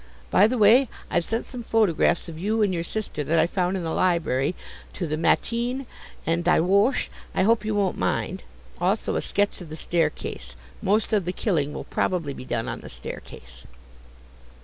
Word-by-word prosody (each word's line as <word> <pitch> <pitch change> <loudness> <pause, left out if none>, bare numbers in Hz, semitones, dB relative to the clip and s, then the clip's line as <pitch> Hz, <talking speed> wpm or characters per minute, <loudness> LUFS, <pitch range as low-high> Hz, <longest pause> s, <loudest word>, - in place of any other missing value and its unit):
By 205 - +6
the 250 +2 -1
way, 230 +4 +6 0.2
I've 175 - +2
sent 225 +6 -2
some 250 - -7
photographs 195 -7 +2
of 160 -2 -8
you 215 +4 +1
and 200 -3 +1
your 170 -1 -1
sister, 185 -5 -4
that 165 +4 +1
I 160 - +5
found 180 +1 0
in 180 - -4
the 165 - -2
library, 170 -4 +1 0.4
to 180 - -3
the 155 -1 -1
MATIN 240 - 0 0.4
and 165 +1 +1
DIE 180 - +4
WOCHE; 200 - +2 0.2
I - - +3
hope 220 +2 +3
you 215 0 -1
don't 200 -3 0
mind. 90 -7 -1 0.4
Also - - 0
a - - +1
sketch 205 -1 0
of 170 - -9
the 155 - -6
staircase; 155 - -2 0.3
most 210 +3 +1
of 200 -5 +2
the 180 - -1
killing 160 -8 0
will - - -5
probably 165 -6 -1
be 130 - -9
done 120 -3 -2
on - - -4
the - - -10
staircase." - - -10
180 Hz, 190 wpm, -25 LUFS, 160-215 Hz, 0.4 s, By